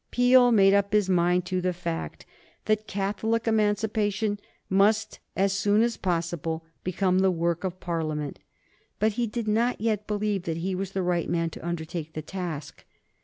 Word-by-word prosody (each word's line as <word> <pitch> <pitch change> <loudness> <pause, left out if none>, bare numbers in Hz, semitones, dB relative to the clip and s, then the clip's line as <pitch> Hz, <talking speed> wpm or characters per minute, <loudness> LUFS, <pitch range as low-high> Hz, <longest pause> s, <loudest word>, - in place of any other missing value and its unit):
Peel 245 0 +5
made 195 -3 +6
up 200 0 +2
his 210 -2 +3
mind 180 0 +2
to 185 0 -1
the 180 0 0
fact 170 -2 -5 0.4
that 215 0 0
Catholic 220 +4 -1
Emancipation 210 -1 +1 0.3
must, 210 +3 +2 0.2
as 195 0 +2
soon 205 +2 +3
as 235 -1 0
possible, 165 -2 -2 0.2
become 185 0 +1
the 190 0 +4
work 170 -1 -1
of 185 -1 -3
Parliament. 155 -4 -3 0.6
But 215 +1 +2
he 235 +2 -1
did 225 +1 -4
not 230 +4 +1
yet 215 -1 -1
believe 205 -3 -1
that 165 -1 -2
he 185 +3 -2
was 190 +1 -4
the 190 - -1
right 175 -1 0
man 165 -1 0
to - - -10
undertake 165 -1 -4
the 155 - -5
task. 165 -4 -6
195 Hz, 170 wpm, -26 LUFS, 170-215 Hz, 0.6 s, made